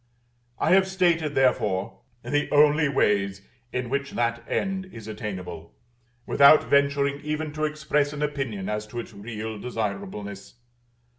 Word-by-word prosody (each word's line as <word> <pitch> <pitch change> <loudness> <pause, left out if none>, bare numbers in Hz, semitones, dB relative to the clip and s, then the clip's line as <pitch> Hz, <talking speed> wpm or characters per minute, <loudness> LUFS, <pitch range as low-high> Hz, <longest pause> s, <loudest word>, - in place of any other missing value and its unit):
I - - +1
have 190 +1 +5
stated, 170 -5 +1
therefore, 115 -6 +1 0.2
the 145 +5 0
only 150 0 +5
ways 100 -6 +1 0.3
in 125 -1 -2
which 140 +2 -2
that 115 0 -1
end 190 -1 -1
is 115 - -11
attainable, 90 -6 -7 0.5
without 140 +2 +7
venturing 140 0 +2
even 150 0 -3
to 155 0 -1
express 150 -1 0
an 150 0 -4
opinion 135 -10 -3
as 105 0 -3
to 120 +3 -6
its 115 - -8
real 110 +1 -6
desirableness. 100 -3 -5
130 Hz, 135 wpm, -25 LUFS, 105-150 Hz, 0.5 s, without